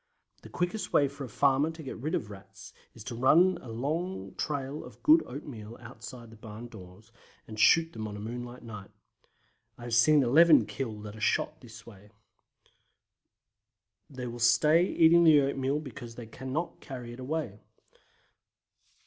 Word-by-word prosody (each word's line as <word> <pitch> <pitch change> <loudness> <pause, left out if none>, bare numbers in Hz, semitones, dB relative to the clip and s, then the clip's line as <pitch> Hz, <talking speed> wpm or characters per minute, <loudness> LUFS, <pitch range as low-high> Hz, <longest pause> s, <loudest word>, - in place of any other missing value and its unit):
The - - -13
quickest 180 +4 -3
way 145 - +4
for 140 0 -8
a - - -10
farmer 140 +6 +2
to 160 0 -9
get 135 - -6
rid 155 +9 -2
of 105 -9 -4
Rats 95 -1 -13 0.2
is 110 - -11
to 120 +1 -6
run 170 +10 +4
a 125 - -11
long 155 +11 -4
trail 145 0 -4
of - - -14
good 315 +2 +6
oatmeal 120 -6 -9
outside 120 0 -11
his 110 - -15
barn 110 +2 -9
doors, 105 +1 -14 0.4
and 110 -1 -8
shoot 165 +7 +4
them 110 -1 -5
on 105 -1 -7
a - - -8
moonlight 120 +3 -7
night. 105 -4 -9 0.9
I 120 - -12
have 120 -1 -5
seen 140 +5 +5
11 155 +6 +6
killed 110 -5 -6
at 105 0 -8
a - - -11
shot 110 - +1
in 155 +1 -28
this 115 0 -13
way. 105 -2 -15 2.0
They 130 -3 -7
will 120 0 -6
stay 150 +8 +4
eating 170 -1 +5
the 155 -3 +7
oatmeal 135 +1 -1
because 120 -5 -9
they 120 - -8
cannot 130 +8 -5
carry 125 -3 -8
it 120 - -12
away. 130 -6 -4
125 Hz, 170 wpm, -29 LUFS, 115-150 Hz, 2.0 s, the